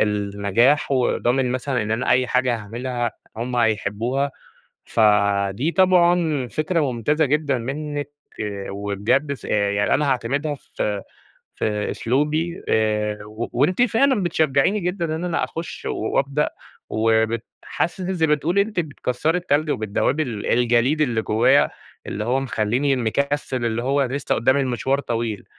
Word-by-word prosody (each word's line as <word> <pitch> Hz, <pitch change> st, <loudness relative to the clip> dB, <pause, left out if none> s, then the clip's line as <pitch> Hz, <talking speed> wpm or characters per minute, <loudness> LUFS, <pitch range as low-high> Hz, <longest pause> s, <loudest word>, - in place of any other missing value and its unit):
النجاح 105 Hz, +7 st, +2 dB
وضامن 125 Hz, 0 st, +1 dB
مثلًا 130 Hz, -1 st, -1 dB
إن 105 Hz, -, -4 dB
أنا 115 Hz, +3 st, 0 dB
أي 125 Hz, +1 st, +4 dB
حاجة 125 Hz, -1 st, +1 dB
هاعملها 120 Hz, +2 st, -3 dB, 0.2 s
هم 120 Hz, +2 st, -3 dB
هيحبّوها، 115 Hz, +4 st, 0 dB, 0.5 s
فدي 100 Hz, +3 st, +2 dB
طبعًا 175 Hz, -7 st, +3 dB
فكرة 155 Hz, -, 0 dB
ممتازة 150 Hz, +7 st, +1 dB
جدًا 145 Hz, -2 st, +1 dB
منِّك 145 Hz, +4 st, -4 dB, 0.6 s
وبجد 100 Hz, +8 st, 0 dB
س 140 Hz, -, -8 dB
يعني 100 Hz, -1 st, +1 dB
أنا 145 Hz, 0 st, +1 dB
هاعتمدها 140 Hz, +4 st, -1 dB
في 105 Hz, -6 st, -4 dB, 0.5 s
في 105 Hz, -1 st, -1 dB
أسلوبي 150 Hz, +7 st, -1 dB
آآ 105 Hz, -1 st, +1 dB
و 110 Hz, +2 st, -5 dB
وأنتِ 165 Hz, -, +2 dB
فعلًا 245 Hz, -1 st, +3 dB
بتشجّعيني 160 Hz, +3 st, +2 dB
جدًا 170 Hz, -3 st, -2 dB
إن 170 Hz, -, -4 dB
أنا 175 Hz, -2 st, 0 dB
أخُش 165 Hz, +1 st, -7 dB
وأبدأ 140 Hz, +6 st, 0 dB, 0.4 s
وبت 110 Hz, +1 st, +1 dB, 0.2 s
حاسِس 175 Hz, +4 st, -2 dB
إن 185 Hz, +1 st, -2 dB
زي 165 Hz, -3 st, +2 dB
ما 150 Hz, -, +4 dB
بتقولي 170 Hz, +7 st, +1 dB
أنتِ 210 Hz, -4 st, -2 dB
بتكسّري 155 Hz, +1 st, -1 dB
التلج 155 Hz, -3 st, 0 dB
وبتدوِّبي 110 Hz, +7 st, 0 dB
ال 115 Hz, -7 st, -5 dB
الجليد 120 Hz, +5 st, +2 dB
اللي 120 Hz, -7 st, +1 dB
جوّايا 110 Hz, +2 st, +3 dB, 0.4 s
اللي 105 Hz, +1 st, -3 dB
هو 130 Hz, +3 st, +1 dB
مخلّيني 130 Hz, +3 st, 0 dB
مكسِّل 130 Hz, +1 st, -1 dB
اللي 115 Hz, 0 st, -1 dB
هو 140 Hz, +2 st, +1 dB
لسّه 135 Hz, +2 st, -1 dB
قُدّامي 130 Hz, +5 st, +2 dB
المشوار 130 Hz, +2 st, 0 dB
طويل. 115 Hz, -5 st, -3 dB
130 Hz, 135 wpm, -22 LUFS, 110-150 Hz, 0.6 s, أي